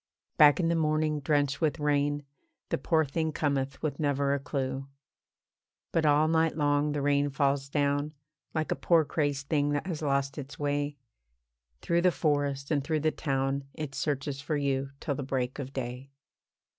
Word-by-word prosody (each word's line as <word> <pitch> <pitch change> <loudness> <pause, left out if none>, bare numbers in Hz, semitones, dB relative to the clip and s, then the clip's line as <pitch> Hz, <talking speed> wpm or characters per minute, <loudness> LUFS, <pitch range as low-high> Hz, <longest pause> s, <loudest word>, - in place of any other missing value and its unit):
Back 150 +1 +7
in 170 - +2
the 170 - +2
morning, 155 -1 +1
drenched 145 0 +1
with 160 0 +1
rain, 145 0 +1 0.5
The - - 0
poor 160 +3 +2
thing 160 +3 -1
cometh 140 -3 -1
with 145 -3 -2
never 140 -2 +1
a 140 - 0
clue. 135 -1 -3 1.0
But 160 -2 +2
all 150 +1 +4
night 160 0 +2
long 145 0 +2
the 145 -1 -2
rain 145 0 +2
falls 140 0 0
down, 145 +1 0 0.4
Like 155 -1 -2
a - - +2
poor 165 -3 +3
crazed 145 -2 -1
thing 145 -1 +2
that 145 - -1
has 170 -5 -4
lost 140 -1 0
its 145 +1 -8
way, 145 0 -1 0.9
Through 170 0 +2
the 180 0 +4
forest 145 -3 0
and 145 -3 +1
through 155 +1 0
the 155 +1 +2
town 135 -1 -1
It 150 -4 -5
searches 140 -1 -2
for 150 +1 -1
you 135 -1 0
till 145 - -2
the 140 - -4
break 130 0 -2
of 135 -1 -5
day. 130 0 -5
145 Hz, 175 wpm, -29 LUFS, 140-155 Hz, 1.0 s, Back